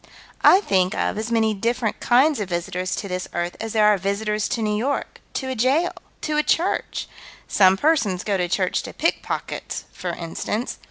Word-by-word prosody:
I 380 - +7
think 190 - +1
of - - 0
as 220 +2 -4
many 220 -1 +2
different 230 +2 -1
kinds 265 +3 +4
of 200 -3 -3
visitors 180 +1 -2
to 200 - -4
this 180 -1 -3
earth 175 0 -2
as 225 -1 -4
there 215 -1 +4
are 210 -2 +5
visitors 210 +2 -1
to 230 - -2
New 210 -1 0
York, 265 +7 -2
to 265 - -2
a - - -1
jail, 265 +9 +2 0.3
to 305 -1 -1
a - - +5
church 350 +6 0 0.4
some 190 -1 +5
persons 225 - +2
go 205 - 0
to 180 -2 0
church 185 0 +1
to - - -8
pick - - 0
pockets, - - -4
for 180 - -5
instance. 175 +7 -4
210 Hz, 195 wpm, -23 LUFS, 185-245 Hz, 0.4 s, I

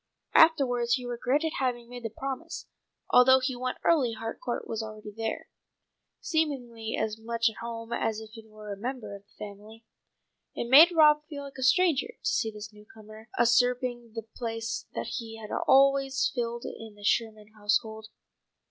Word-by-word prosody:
Afterwards 250 -7 +4
he 250 -2 -6
regretted 255 +6 0
having 245 -3 -1
made 245 0 -9
the 225 - -4
promise. 265 +4 -6 0.5
Although 260 +1 +7
he 260 0 -2
went 255 +1 -3
early 275 -9 +3
Harcourt 225 +2 -5
was 225 0 -3
already 215 -1 -8
there, 225 0 -4 0.7
seemingly 245 -9 -2
as 220 0 -2
much 230 +1 0
at - - -17
home 230 0 -6
as 220 -1 -1
if 220 -1 -11
he 225 0 -11
were 215 -1 -8
a - - -9
member 240 -1 -5
of 200 - -11
the - - -30
family. 210 +2 -10 0.7
It 235 - -3
made 320 +6 +9
Rob 300 -3 +5
feel 285 -2 -6
like 275 -1 -10
a - - -5
stranger 330 +5 +3
to - - -5
see 220 - 0
this 210 0 -9
newcomer 215 +1 -14
usurping 240 0 +2
the 225 - -4
place 225 0 -5
that - - -3
he 225 -1 -8
had 215 -1 -9 0.2
always 275 0 +4
filled 235 -1 -3
in 220 -2 -8
the 205 - -15
Sherman 215 0 0
household. 215 +1 -1
235 Hz, 165 wpm, -28 LUFS, 220-260 Hz, 0.7 s, made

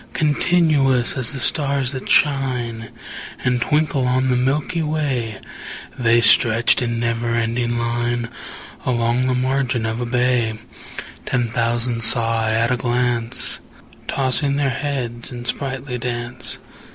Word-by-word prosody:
Continuous 150 -5 +2
as 130 -4 -1
the 135 - -6
stars 140 -1 +1
that 130 -2 -6
shine 125 -5 +1 0.5
And 125 -1 +1
twinkle 150 -3 +1
on 130 +1 +1
the 125 - +2
milky 140 +7 0
way, 140 -8 -2 0.6
The 120 -1 +3
stretched 115 +2 +5
in 115 -1 -1
never 115 0 -1
ending 120 +1 -1
line 120 0 -1 0.6
Along 120 +1 +1
the 130 - +1
margin 130 -2 0
of 110 +2 -2
a 120 - -2
bay: 120 -2 +1 0.7
Ten 120 -2 0
thousand 115 0 0
saw 115 -1 +3
I 110 - 0
at 115 +2 +1
a 125 - +1
glance, 120 -1 0 0.5
Tossing 140 +1 +1
their 140 -2 +1
heads 120 -3 -4
in 120 -1 -7
sprightly 135 -1 -3
dance. 120 0 -4
125 Hz, 130 wpm, -20 LUFS, 115-135 Hz, 0.7 s, stretched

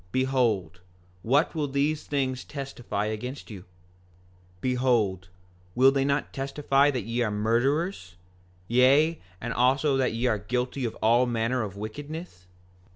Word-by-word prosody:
Behold, 115 -10 0 0.4
what 140 - +2
will 155 -3 -1
these 145 +3 0
things 130 -3 -1
testify 130 -7 -4
against 120 +5 -5
you? 100 - -7
5:23 90 - -16 1.0
Behold 120 -8 +1 0.5
will 130 +2 +6
they 135 0 +1
not 140 +1 -1
testify 140 +1 +2
that 130 -6 -2
ye 115 +3 -2
are 115 - +1
murderers, 115 - 0 0.5
yea, 140 +7 +4 0.2
and 115 +3 -4
also 135 +3 +2
that 130 -3 +1
ye 115 +2 -2
are 110 -4 +1
guilty 125 +5 -2
of 115 - -3
all 120 +3 +4
manner 120 +1 0
of 100 -3 -5
wickedness? 145 - -7
125 Hz, 140 wpm, -27 LUFS, 110-140 Hz, 1.0 s, will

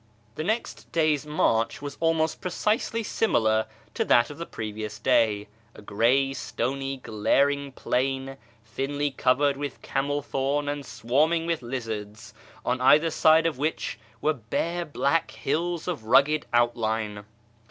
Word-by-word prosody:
The 155 - -4
next 220 +7 -3
day's 155 -3 +1
march 115 -7 +1
was 145 0 -6
almost 165 -1 +1
precisely 215 +5 -1
similar 110 - +1 0.3
to - - 0
that 120 +3 +4
of 145 - -11
the 170 - -5
previous 110 -1 -5
day 105 -3 +2
— 115 +2 -34
a - - -12
gray, 125 +7 +2
stony, 135 +1 -3
glaring 140 +5 +1
plain 135 +1 -2 0.3
(thinly 140 +5 -2
covered 135 +2 +2
with 145 0 -6
camel 145 +1 -1
thorn 145 +1 -1
and 145 0 -3
swarming 140 +8 +1
with 165 -3 -1
lizards), 110 -4 -6 0.3
on 125 +1 0
either 150 +5 +5
side 160 +1 +5
of 160 -6 -1
which 155 -2 -2 0.2
were 155 - +2
bare 165 +8 -2
black 145 +2 0
hills 170 +4 -2
of 155 -11 -3
rugged 140 +6 +4
outline. 110 -3 0
135 Hz, 140 wpm, -26 LUFS, 115-155 Hz, 0.3 s, either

